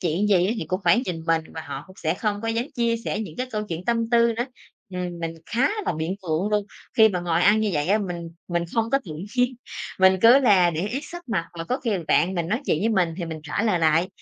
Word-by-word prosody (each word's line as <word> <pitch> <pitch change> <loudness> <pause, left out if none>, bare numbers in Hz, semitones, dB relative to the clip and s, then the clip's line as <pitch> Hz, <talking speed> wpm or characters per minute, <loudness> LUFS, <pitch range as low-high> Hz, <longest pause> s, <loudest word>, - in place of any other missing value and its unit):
chuyện 175 +4 0
gì 185 -2 +4
á 220 - +1
thì - - -3
cũng 185 +3 -2
phải 235 +9 +4
nhìn 165 -2 -4
mình 165 -1 +2
và 160 - -4
họ 140 0 -6
cũng 185 - -16
sẽ 160 0 -1
không 205 +1 -2
có 225 - -2
dám 230 +1 0
chia 235 -1 +1
sẻ 210 - -2
những 175 -8 -7
cái 255 - -2
câu 215 -2 -2
chuyện 170 +2 -5
tâm 230 -1 0
tư 235 -1 +4
nữa. 240 - 0 0.5
Ừm, 180 -1 -4
mình 165 0 -3
khá 245 +6 +2 0.2
là - - +1
bị 160 +1 -2
ngượng 185 -1 -2
luôn, 210 -1 +1 0.3
khi 220 -1 +7
mà 180 -3 -2
ngồi 170 -1 0
ăn 210 +3 +5
như 215 -2 +1
vậy 150 +1 0
á 210 +3 +4
mình 175 -4 -5 0.2
mình 170 -1 0
không 230 0 +1
có 275 - +4
tự 160 - -7 0.2
nhiên, 250 +1 +2 0.5
mình 190 0 +6
cứ 235 +4 +8
là 185 -8 +5
để 170 +5 -2
ý 255 +5 -2
sắc 345 -5 -10
mặt 170 -7 0
và 165 - -3
có 255 +9 -2
khi 235 - -1 0.2
bạn 185 +2 +3
mình 170 -1 -2
nói 225 +7 0
chuyện 155 - +2
với 220 - +1
mình 180 -7 +1
thì 175 - -2
mình 160 -1 -6
trả 150 +8 -2
lời 210 -6 +2
lại, 165 +3 +3
190 Hz, 275 wpm, -24 LUFS, 170-225 Hz, 0.5 s, cứ